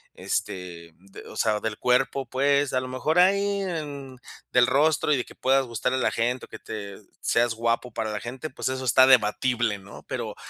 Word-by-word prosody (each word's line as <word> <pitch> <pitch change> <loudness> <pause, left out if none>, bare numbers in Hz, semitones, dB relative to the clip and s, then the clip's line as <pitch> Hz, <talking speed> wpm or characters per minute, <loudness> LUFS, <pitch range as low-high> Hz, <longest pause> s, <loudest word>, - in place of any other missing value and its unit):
este, 85 -2 -4
d 95 +2 -14
o - - -10
sea, 110 -1 +1
del 110 -1 -3
cuerpo, 130 +2 +1
pues. 140 +2 +1
A 130 - +2
lo 130 - -6
mejor 150 +7 0
ahí, 200 +2 +3
em, 145 -7 -5 0.3
del 125 0 +5
rostro 150 +3 +2
y 140 - +2
de 125 - -1
que - - -15
puedas 135 +1 +2
gustarle 125 +3 -1
a - - -2
la - - +2
gente 120 +2 -1
o - - -44
que - - -10
te 100 -2 -7 0.2
seas 115 0 +2
guapo 115 +1 -1
para 110 -1 -2
la 105 - -3
gente, 130 +6 -6
pues, 130 - -5
eso 130 0 -3
está 130 +2 +6
debatible, 120 -2 +3
¿no? 100 +1 -13
Pero, - - -4
125 Hz, 205 wpm, -25 LUFS, 110-140 Hz, 0.3 s, está